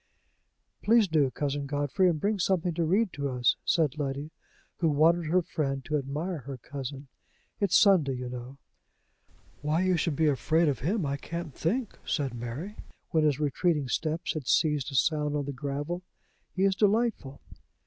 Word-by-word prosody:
"Please 225 -1 +4
do, 155 -5 +2
Cousin 140 +1 -3
Godfrey; 145 +6 +1
and 160 -3 -1
bring 205 +4 0
something 180 -1 +1
to 170 - 0
read 195 +5 +2
to 140 -1 -2
us," 125 0 +2
said 155 -3 +1
Letty, 140 +2 -3 0.5
who 165 - +2
wanted 160 +3 +3
her 180 +3 +2
friend 135 -5 -2
to 155 - -1
admire 150 +5 -2
her 135 0 -7
cousin. 135 +2 -7 0.5
"It's 200 -3 +4
Sunday, 185 -10 +5
you 125 0 -5
know." 125 +2 -7 1.0
"Why 150 +4 +1
you 185 -1 +2
should 165 -2 0
be 160 - +2
afraid 155 +3 +2
of 135 -6 0
him, 180 - 0
I 140 0 -1
can't 170 +1 -6
think," 220 - -2
said 140 -6 -1
Mary, 120 - -6 0.3
when 160 -1 +3
his 150 -2 +2
retreating 150 -1 0
steps 160 +5 -1
had 155 -6 -5
ceased 150 -4 +2
to 140 - -5
sound 150 +2 +1
on 145 -1 -1
the 140 - -4
gravel. 145 +6 -4 0.5
"He 190 - +1
is 195 -1 +4
delightful!" 210 - +1
150 Hz, 170 wpm, -28 LUFS, 140-175 Hz, 1.0 s, Sunday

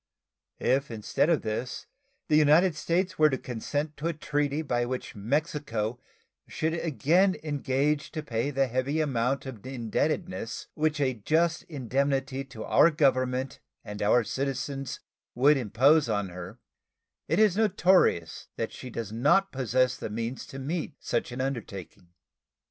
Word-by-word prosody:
If 140 +2 +1
instead 115 +7 0
of 165 -4 +2
this 110 +4 -4 0.4
the 150 - +3
United 155 +3 +5
States 170 +4 -1
were 155 0 +6
to 135 - -1
consent 145 +6 -4
to 150 +3 -2
a 170 - 0
treaty 150 0 -1
by 120 -5 0
which 125 +1 -4
Mexico 120 -1 -2 0.5
should 160 +1 -1
again 170 +4 +2
engage 145 0 0
to 155 - -4
pay 120 -1 -1
the 135 -1 +1
heavy 130 +5 -1
amount 135 -3 0
of 120 -6 -8
indebtedness 120 -3 -2
which 155 -1 0
a 135 -2 +2
just 160 +9 +1
indemnity 135 -1 -1
to 125 -5 -9
our 165 - +5
Government 130 -4 +1 0.3
and 105 0 -7
our 110 +4 +4
citizens 135 +2 -3 0.3
would 140 +5 +5
impose 130 +4 +3
on 105 -3 -1
her, 90 +5 -8 0.7
it - - +1
is 210 -3 +4
notorious 185 - +2
that - - -3
she 130 - -8
does 115 -3 -5
not 160 - +3
possess 130 -1 +1
the - - -5
means 115 +4 -4
to 135 - -9
meet 155 +2 -3
such - - -2
an 125 +2 -4
undertaking. 110 -10 -5
135 Hz, 145 wpm, -28 LUFS, 120-155 Hz, 0.7 s, were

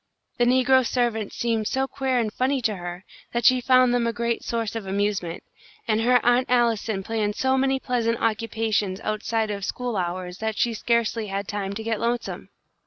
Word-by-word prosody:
The 240 - +4
negro 260 +1 +4
servants 230 -3 -1
seemed 225 -2 0
so 265 0 0
queer 265 -2 -1
and 225 -3 0
funny 265 +2 +1
to 215 -4 0
her 175 +1 -7 0.3
that 235 0 -1
she 255 -1 +6
found 255 0 +4
them 240 -1 +1
a - - +1
great 235 0 -2
source 230 -2 -2
of 220 -4 -5
amusement, 195 -3 -1 0.4
and 220 0 +2
her 250 +2 +4
Aunt 245 +2 +3
Allison 230 -5 +1
planned 210 -1 -1
so 260 +2 +1
many 265 0 +1
pleasant 235 -3 0
occupations 220 -3 0
outside 215 0 -1
of 200 -1 -4
school 245 +3 -3
hours 180 0 -3
that 220 -1 -2
she 235 - +1
scarcely 230 -1 0
had 195 0 -3
time 200 -1 -3
to 220 +2 -5
get 225 -1 -1
lonesome. 235 0 -2
230 Hz, 185 wpm, -24 LUFS, 210-245 Hz, 0.4 s, she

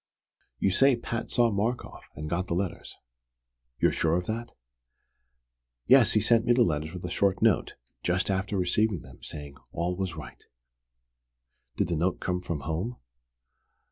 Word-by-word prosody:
"You 95 - +2
say 135 +7 +5
Pat 115 0 -4
saw 120 -1 +3
Markoff, 110 +5 -3
and 75 +1 -5
got 90 +4 -1
the 85 - -1
letters. 90 -1 -3 0.8
You're - - +4
sure 80 0 +1
of 90 - -2
that?" 115 +3 -4 1.3
"Yes, 130 -2 +6
he 110 - +3
sent 115 +2 +3
me 120 - +4
the 120 0 +5
letters 80 -3 -1
with 90 - -6
a - - -3
short 100 +2 +1
note, 110 -5 +2 0.3
just 90 +2 +1
after 95 +1 -1
receiving 95 0 +1
them, - - -14
saying 75 -2 -8
'all 85 +2 -1
was 95 -2 -3
right.'" 75 - -10 1.3
"Did - - 0
the 85 - 0
note 90 +3 0
come 90 0 -2
from 85 -5 -4
home?" 85 - -3
95 Hz, 160 wpm, -28 LUFS, 85-110 Hz, 1.3 s, Yes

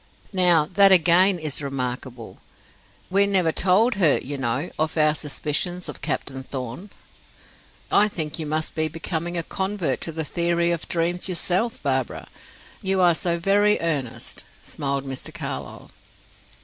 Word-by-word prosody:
Now, 175 -4 +4
that 195 +1 +6
again 180 +2 +5
is 155 -3 -1
remarkable. 125 -3 -5 0.7
We 200 +1 +3
never 185 -5 +2
told 195 +9 +3
her, 155 -5 +5
you 145 +3 -5
know, 135 +5 -2
of 155 +1 -1
our 155 -1 +4
suspicions 155 +4 -1
of - - -8
Captain 135 -1 -3
Thorn." 130 - -7 1.0
"I 210 - +5
think 160 -6 -4
you 155 - -4
must 155 +1 -2
be 155 -1 0
becoming 165 +2 -3
a 170 - -1
convert 190 -9 -2
to 165 - -2
the 160 0 -2
theory 170 +2 +1
of 170 -2 -3
dreams 175 +2 -1
yourself, 185 +3 -1
Barbara; 130 -3 -2 0.5
you 190 0 +1
are 175 -2 +5
so 170 +1 -1
very 205 +4 +3
earnest," 145 -8 -2 0.2
smiled 140 -1 -3
Mr. 135 -1 -3
Carlyle. - - -6
165 Hz, 145 wpm, -23 LUFS, 145-185 Hz, 1.0 s, that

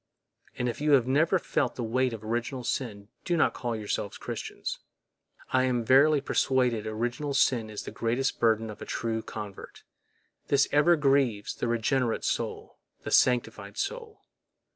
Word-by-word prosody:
And 125 - -1
if 120 +3 -4
you 150 -1 +3
have 130 -4 +5
never 155 +8 +3
felt - - -1
the 120 - -4
weight 130 +3 +1
of 110 -2 -7
original 120 +3 -3
sin, 105 -5 -3
do 175 -1 0
not - - +3
call 120 -2 -3
yourselves 105 -1 -3
Christians. - - -5 0.7
I 130 0 +4
am 120 -2 0
verily 140 +4 +5
persuaded 125 -5 +1
original 120 +6 -2
sin 120 -5 +2
is 105 -1 -6
the - - -7
greatest 120 +4 -1
burden 110 -1 +2
of 105 - -12
a - - -5
true 115 -1 -2
convert; 105 -3 -9 0.6
this 140 -1 +3
ever 150 +4 +5
grieves 135 -8 +1
the - - -3
regenerate 120 +1 0
soul, - - -3 0.2
the - - -5
sanctified 110 -5 +2
soul. 455 -3 -4
120 Hz, 160 wpm, -28 LUFS, 110-135 Hz, 0.7 s, have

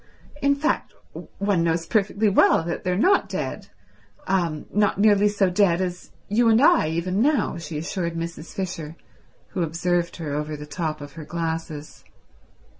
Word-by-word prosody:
In 280 0 +3
fact 305 +3 -1 0.4
one 200 -4 +1
knows 165 0 0
perfectly 210 +2 +1
well 195 -4 +4
that 170 +1 -4
they're 180 0 0
not 380 - +3
dead—not - - -4 1.3
nearly 205 -1 +5
so 200 -2 +1
dead 180 -2 +3
as 180 -1 -4 0.2
you 230 +3 +3
and 220 0 +5
I 300 - +5
even 180 +5 -1
now," 285 - +2
she 160 -1 -6
assured 170 +1 -3
Mrs. 165 -1 -6
Fisher, 165 -5 -5 0.5
who 180 - -3
observed 170 +1 0
her 155 -4 -5
over 150 +1 -3
the 150 - -8
top 155 -1 -4
of 145 0 -8
her 165 - -8
glasses. 160 -1 -5
175 Hz, 150 wpm, -24 LUFS, 160-205 Hz, 1.3 s, nearly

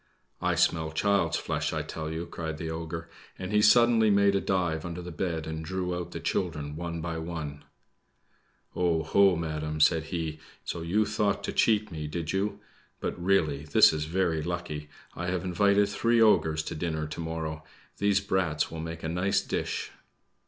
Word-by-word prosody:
"I - - +1
smell 80 -1 +2
child's 95 0 +2
flesh, - - -2
I - - -2
tell 80 -1 -5
you!" 80 +2 -4
cried 80 -2 -5
the 80 0 -4
ogre, 80 0 -5 0.3
and 95 +1 -5
he 105 0 +4
suddenly 115 0 +6
made 100 -1 +4
a 100 - +1
dive 90 -4 0
under 85 0 -5
the 90 0 -7
bed, 80 -1 -2
and 80 0 -4
drew 90 +1 -2
out 90 -1 -4
the - - -6
children 75 -5 -2
one 85 0 -4
by 80 -1 -3
one. 80 -3 -5 1.1
"Oh, 85 -3 +1
ho, 95 +4 +4
madam!" 75 -1 -3
said 80 +1 +4
he; 80 -2 -3 0.3
"so 85 - -4
you 100 +6 +1
thought 105 -1 0
to - - -3
cheat 105 -2 +2
me, 75 -2 -4
did 80 +1 -3
you? 100 +2 -1 0.4
But, - - -3
really, 80 -7 +2
this 75 - +6
is 75 -1 -2
very 85 -1 0
lucky! 75 -3 -4 0.3
I 90 - -4
have 90 0 -1
invited 100 +3 +3
three 115 +3 +2
ogres 80 -8 +4
to - - -5
dinner 80 -1 -2
to 75 - -7
morrow; 80 -1 -4 0.4
these 100 -1 +3
brats 90 -5 0
will 80 - -6
make 80 0 -6
a - - -1
nice 95 +4 +1
dish." - - -3
85 Hz, 180 wpm, -28 LUFS, 80-95 Hz, 1.1 s, suddenly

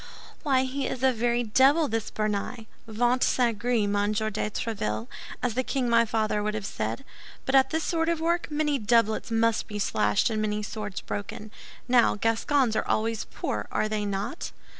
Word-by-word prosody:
"Why 265 -4 +2
he 265 +1 -2
is 255 - -4
a 260 -1 +4
very 240 +1 +1
devil, 270 +8 +4
this 225 -1 -2
Béarnais! 215 +2 -2 0.2
Ventre 240 +3 +2
saint 235 -4 +1
gris, 235 -2 +1
Monsieur 205 +1 0
de 210 0 -2
Tréville, 115 - -3 0.4
as 250 -2 +1
the 255 - +1
king 260 -1 -1
my 230 0 +4
father 215 -1 0
would 210 +1 -1
have 215 -2 -4
said. 110 - -4 0.4
But 265 - -1
at 265 0 +5
this 320 +1 -1
sort 325 -1 0
of 335 -1 0
work, 340 +1 0
many 295 -2 0
doublets 225 0 +2
must 225 -1 +1
be 210 - -5
slashed 205 +1 +1
and 215 -1 -1
many 210 0 -1
swords 205 -2 -5
broken. 205 +1 -6 0.4
Now, 245 -1 +4
Gascons 230 +3 +1
are - - -1
always 225 0 0
poor, - - -4
are 215 - +1
they 215 -1 -2
not?" 205 - -3
225 Hz, 185 wpm, -27 LUFS, 210-255 Hz, 0.4 s, at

